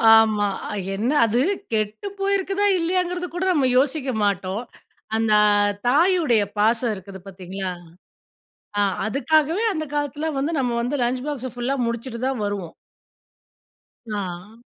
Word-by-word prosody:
ஆமா. 215 -2 +4 0.5
என்ன 220 +5 -1 0.2
அது 230 +3 +1 0.3
கெட்டு 215 - -1
போயிருக்குதா, 395 0 +1
இல்லையாங்கிறது 360 +1 -1
கூட 360 +1 -1
நம்ம 280 -6 +2
யோசிக்க 270 0 +1
மாட்டோம். 195 +2 -1 0.5
அந்த 225 -1 +2 0.5
தாயுடைய 305 - +4 0.2
பாசம் 230 +2 +2
இருக்குது 190 0 -10
பாத்தீங்களா, 190 0 -5 1.1
ஆ - - +4 0.3
அதுக்காகவே 315 - +2
அந்த 310 -2 -3
காலத்துல 290 +1 -2
வந்து 280 +4 0
நம்ம 250 -2 0
வந்து 245 +5 -1
லஞ்ச் 250 +1 -1
பாக்ஸ 260 -4 -3
ஃபுல்லா 245 +3 -1
முடிச்சுட்டு 235 +1 -4
தான் 265 -4 -2
வருவோம். 200 -5 -4 1.4
ஆ. 190 +2 -6
245 Hz, 120 wpm, -23 LUFS, 210-310 Hz, 1.4 s, ஆமா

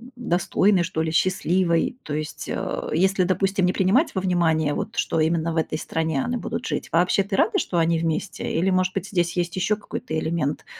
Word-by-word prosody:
достойной, 190 -3 +2
что 165 -2 -2
ли, 160 0 -1
счастливой? 185 +2 +1
То 150 - -5
есть, 155 0 -4
э, - - -3
если, 190 +3 +2
допустим, 195 +1 +1
не 180 - +1
принимать 210 - +2
во 190 - 0
внимание, 165 -5 +1
вот, - - -4
что - - 0
именно 165 +1 +1
в - - -3
этой 160 -1 -1
стране 160 -3 -1
они 245 - -2
будут 240 - -4
жить, - - -3
вообще 180 +3 +3
ты 195 0 -3
рада, 430 - +2
что 175 - -2
они 165 0 +2
вместе? 165 +3 -2
Или, 175 +4 +1
может 185 0 +1
быть, 195 0 -3
здесь 175 -3 0
есть 175 -1 -1
ещё 190 +3 +1
какой-то 160 -6 -5
элемент 155 -3 -2
175 Hz, 200 wpm, -23 LUFS, 160-190 Hz, -, вообще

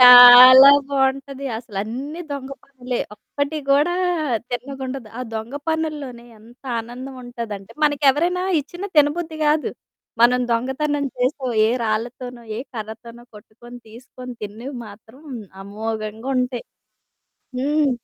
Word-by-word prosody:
చాలా 250 +2 +11 0.2
బావుంటది 275 0 -1
అసలన్నీ 245 - -6
దొంగ 275 -1 -6
పనులే, 255 -2 -5 0.2
ఒక్కటి 285 +6 -4
కూడా 295 +6 +3 0.6
తిన్నగుండదు. 260 -1 -6
ఆ - - -4
దొంగ 220 +5 -5
పనుల్లోనే 300 -7 -3
ఎంత 235 +4 -19 0.2
ఆనందం 250 +4 -9
ఉంటాదంటే 230 -4 -7
మనకి 290 -1 0
ఎవరైనా 350 +6 -1 0.2
ఇచ్చిన 350 +7 -8
తినబుద్ధి 315 +2 +2
కాదు. 300 +1 +1 0.5
మనం 250 +1 +5
దొంగతనం 280 +4 -1
చేసో, 260 +2 -1 0.2
ఏ - - +2 0.2
రాళ్ళతోనో, 240 +2 -4
ఏ - - -4 0.2
కర్రతోనో 230 +2 -9
కొట్టుకొని, 235 +4 -14
తీసుకొని 250 +2 -11
తిన్నివి 230 +7 -7
మాత్రం 220 +6 -15 0.4
అమోఘంగుంటయి. 225 +5 -3 0.9
హ్మ్. 290 +2 +1
255 Hz, 105 wpm, -21 LUFS, 235-280 Hz, 0.9 s, చాలా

